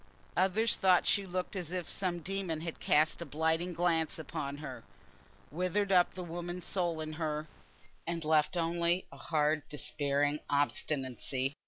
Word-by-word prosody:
Others 195 +5 +3
thought 185 -2 +5
she 200 -1 +3
looked 185 +2 -3
as 175 -4 -3
if 180 -2 -2
some 180 -3 -2
demon 185 -3 -2
had 165 -1 -5
cast 155 +3 +3
a - - -1
blighting 160 +4 0
glance 165 -2 +1
upon 145 -2 -4
her, 150 - -7 0.7
withered 185 +5 0
up 180 -2 +5
the 185 - -4
woman's 175 +1 -5
soul 175 -4 0
in 155 0 -4
her, 155 0 -1 0.6
and 165 -1 -2
left 155 +2 +3
only 170 +2 +1
a - - -11
hard 155 -1 +1
despairing 145 0 0
obstinacy. 135 -1 -1
165 Hz, 150 wpm, -32 LUFS, 150-180 Hz, 0.7 s, thought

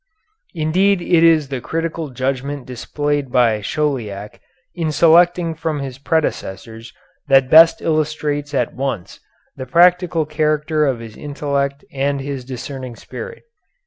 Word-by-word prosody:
Indeed 180 +5 +2
it 170 -1 +2
is 160 -4 +4
the 135 -3 -4
critical 165 0 -3
judgment 135 +2 -3
displayed 145 +2 -3
by 115 -4 +2
Chauliac 105 -7 -3 0.3
in 165 -3 -2
selecting 170 +2 +4
from 160 -1 -3
his 135 -2 -6
predecessors 115 - -3 0.4
that 135 -2 +4
best 165 +1 +7
illustrates 150 -2 -1
at 125 -3 0
once 130 -9 -4 0.4
the 130 -1 -7
practical 175 +2 +3
character 155 0 0
of 125 -4 -1
his 110 -2 -10
intellect 140 -1 -3
and 140 +1 -1
his 135 -1 -5
discerning 130 0 -7
spirit. 475 - -9
145 Hz, 125 wpm, -19 LUFS, 130-160 Hz, 0.4 s, best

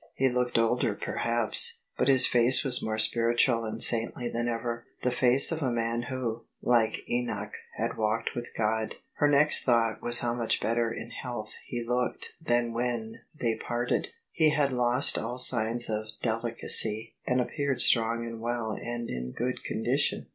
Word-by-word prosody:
He 135 0 +1
looked 125 -1 -2
older 115 -2 0
perhaps: 115 0 +1
but - - -1
his 130 -2 +9
face 120 +1 +5
was 130 -3 +5
more 110 0 -4
spiritual 115 +1 +3
and 110 - -2
saintly 120 +1 +2
than 120 0 -4
ever 120 0 -5
— - - -40
the 125 - 0
face 125 +4 +3
of 165 -1 -4
a 135 - -1
man 115 +1 -3
who, 120 -3 -5 0.2
like 115 -2 0
Enoch, 105 -4 -4 0.2
had 115 +1 -4
walked 110 +1 -2
with 120 -1 -6
God. 110 0 -2 0.2
Her 145 - +2
next 150 +1 +4
thought 115 -3 0
was 120 0 +2
how 120 -1 -2
much 120 -2 -2
better 115 0 -2
in 115 +1 -9
health 120 -4 -7
he 120 -1 -5
looked 125 +1 -3
than 120 -5 -1
when 115 -2 -4 0.2
they 115 -2 -2
parted: 120 +1 -3 0.2
he 160 -2 +2
had 145 -3 0
lost 125 +2 +3
all 120 +3 -5
signs 120 -1 +3
of 110 0 -4
deli 115 0 -3
cacy, 110 -1 +3
and 125 0 0
appeared 140 +1 -3
strong 115 0 +3
and 115 -1 -9
well 120 -1 -4
and 120 +2 -6
in 60 0 -6
good 125 +2 -5
condition. 125 +6 -2
120 Hz, 175 wpm, -26 LUFS, 115-125 Hz, 0.2 s, his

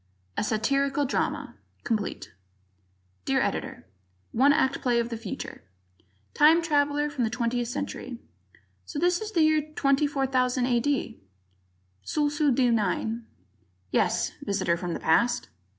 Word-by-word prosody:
A - - 0
Satirical 275 +6 +1
Drama 270 - -2 0.3
Complete 210 - -3 0.9
Dear - - +1
Editor: - - -3 0.5
One 270 +5 +4
Act 265 -2 +1
Play 240 -2 +2
of 235 0 -1
the 230 - -4
Future 220 -3 -7 0.7
Time 320 +3 +5
traveler 295 -2 +1
from 290 -4 -2
the 225 - +1
Twentieth 240 0 -1
Century: 245 +1 -5 0.7
"So 300 - -8
this 350 +4 +2
is 435 0 -5
the 330 - +4
year 310 0 +4
24,000 270 -4 +1
A.D.?" 250 - 0 0.8
Sulsu 295 0 +1
D 250 -1 +3
9: 225 +2 -1 0.6
"Yes, - - +1
Visitor 200 -6 0
from 175 0 -4
the - - -4
Past." 235 - +2
260 Hz, 125 wpm, -27 LUFS, 235-290 Hz, 0.9 s, Time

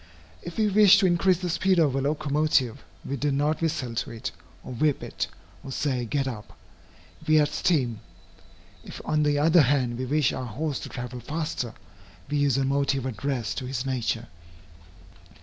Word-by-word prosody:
If 175 - -8
we 215 -1 +3
wish 210 0 +7
to 200 - +3
increase 180 +1 +3
the 180 0 -3
speed 185 +2 +2
of 150 -6 +3
a 135 - +1
locomotive, 145 -3 +1 0.2
we 140 - -3
do 145 +3 0
not 145 +4 0
whistle 150 -7 -1
to 115 - -2
it, 115 -1 -5 0.3
or - - -7
whip 145 +4 +1
it, - - -3 0.4
or 135 - -7
say 130 -3 -1
"get 135 +4 -1
up;" 110 -5 -7 0.7
we 155 0 +5
add 145 -1 +3
steam. 130 -9 0 0.8
If - - -9
on 155 - +1
the 145 -1 +2
other 160 +3 +5
hand 125 -3 +1
we 130 - -2
wish 145 0 +2
our 130 - -4
horse 140 +5 -3
to - - -7
travel 125 -1 -6
faster, 130 -3 -4 0.6
we 145 - +1
use 140 -3 +2
a 135 - +1
motive 140 -1 0
addressed 130 -1 -2
to 125 - -6
his 130 0 -3
nature. 120 -3 -1
140 Hz, 180 wpm, -26 LUFS, 125-155 Hz, 0.8 s, wish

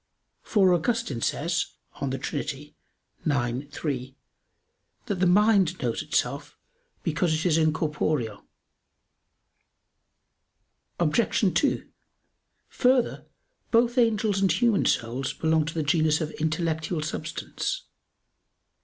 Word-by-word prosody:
For 190 -5 +3
Augustine 175 - 0
says 170 +7 -1 0.3
(De 135 -1 -2
Trin. 145 0 -3
ix, 145 -1 -5
3), 130 -3 -3 0.9
that 210 -5 -1
"the 185 - +3
mind 195 -2 +4
knows - - -1
itself, - - -2 0.5
because 170 -4 +1
it 155 - -2
is 170 -4 +3
incorporeal." 150 -7 0 2.6
Obj. 185 +3 +2
2: 285 - +1 0.8
Further, 250 -1 +1 0.4
both 240 +2 +3
angels 215 -4 +2
and 195 - +3
human 235 -4 +2
souls 125 +3 -1
belong 160 -1 +1
to 165 - -4
the 160 - 0
genus 155 0 +2
of 155 -2 -3
intellectual 160 0 -1
substance. - - -4
160 Hz, 100 wpm, -26 LUFS, 150-200 Hz, 2.6 s, mind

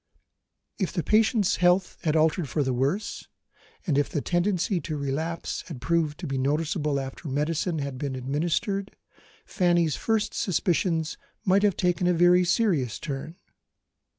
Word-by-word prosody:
If 190 - 0
the 175 -3 -1
patient's 215 -2 +3
health 180 +1 +2
had 155 -1 +2
altered 160 -1 +2
for 145 +4 0
the 130 -1 -1
worse, 140 - -2 0.6
and 145 -6 +2
if 145 - 0
the 150 - -1
tendency 175 +2 0
to 155 -2 -4
relapse 150 +4 -3
had 155 -7 -7
proved 155 +2 0
to - - -4
be 135 -1 -2
noticeable 150 +1 0
after 135 +4 -7
medicine 155 +4 -1
had 140 -3 -4
been 140 -2 -3
administered, 170 - -2 0.5
Fanny's 175 -5 +2
first 220 -2 0
suspicions 170 -3 0 0.3
might 195 +1 +4
have 205 -2 +2
taken 180 -1 +1
a 180 - +3
very 175 +1 +5
serious 175 - +1
turn. 150 +2 -6
165 Hz, 150 wpm, -26 LUFS, 145-180 Hz, 0.6 s, very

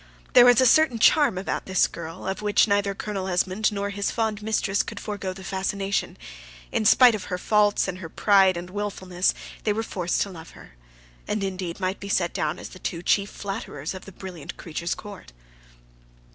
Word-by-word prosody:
There 245 - +9
was 245 -1 +6
a 260 - +5
certain 265 -1 +5
charm 280 -2 +4
about 190 - -3
this 190 -1 +3
girl 165 +1 -8
of 190 +1 -3
which 210 +1 +3
neither 200 -1 +1
Colonel 195 -2 -4
Esmond 190 +4 +1
nor 200 0 -3
his 200 0 -2
fond 220 -2 -1
mistress 210 -2 0
could - - -7
forego 200 -3 -4
the 190 +1 -10
fascination; 195 +1 -2 0.5
in - - 0
spite 245 +3 +7
of 215 - -4
her 180 - -3
faults 205 +2 +2
and 185 -1 -5
her 165 -3 -7
pride 195 -1 +4
and 175 +1 -7
wilfulness, 190 -3 -1 0.3
they 210 - +1
were 225 +2 -2
forced 180 -5 -2
to 200 - -8
love 165 -2 -11
her; - - -14 0.6
and, 210 -1 -1
indeed, 185 -2 -4
might 185 0 -2
be 200 - -7
set 175 -3 +1
down 150 0 -1
as - - -8
the 185 - -13
two 170 -1 -4
chief 200 +3 +2
flatterers 195 -7 -5
of 185 - -9
the 195 - -10
brilliant 185 -4 -9
creature's 170 +1 -4
court. 200 - -11
195 Hz, 195 wpm, -25 LUFS, 185-210 Hz, 0.6 s, There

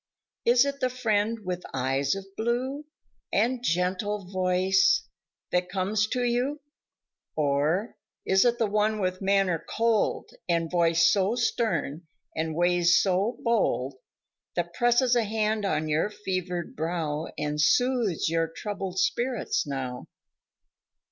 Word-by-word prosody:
Is 240 +2 +5
it 280 0 -3
the 255 - +1
friend 225 -3 0
with 180 -1 -3
the - - -12
eyes 135 +3 0
of 195 0 -6
blue 255 +6 -2 0.5
And 240 +3 +1
gentle 185 +2 -1
voice 185 - +2 0.4
that 180 0 0
comes 200 +3 0
to 250 +2 -1
you, 245 +5 0 0.8
Or, 155 +8 0 0.3
is 190 0 +4
it 240 -1 +2
the 230 - +2
one 210 +1 +1
with 185 -1 -2
manner 195 -4 +1
cold 225 -1 0 0.2
And 165 -1 0
voice 170 -1 +4
so 200 +3 +1
stern 180 - -1 0.3
and 160 0 -2
ways 175 0 +4
so 200 +5 +1
bold, 205 - +1 0.6
That 175 -1 -2
presses 240 +2 +3
a 240 - +4
hand 215 0 -1
on 155 -5 0
your 155 +6 +1
fevered 185 -4 -4
brow 160 -1 -2
And 150 0 -1
soothes 235 +1 +2
your 165 0 +1
troubled 190 +2 -5
spirits 260 - 0
now. 130 -2 -4
195 Hz, 130 wpm, -27 LUFS, 170-230 Hz, 0.8 s, Is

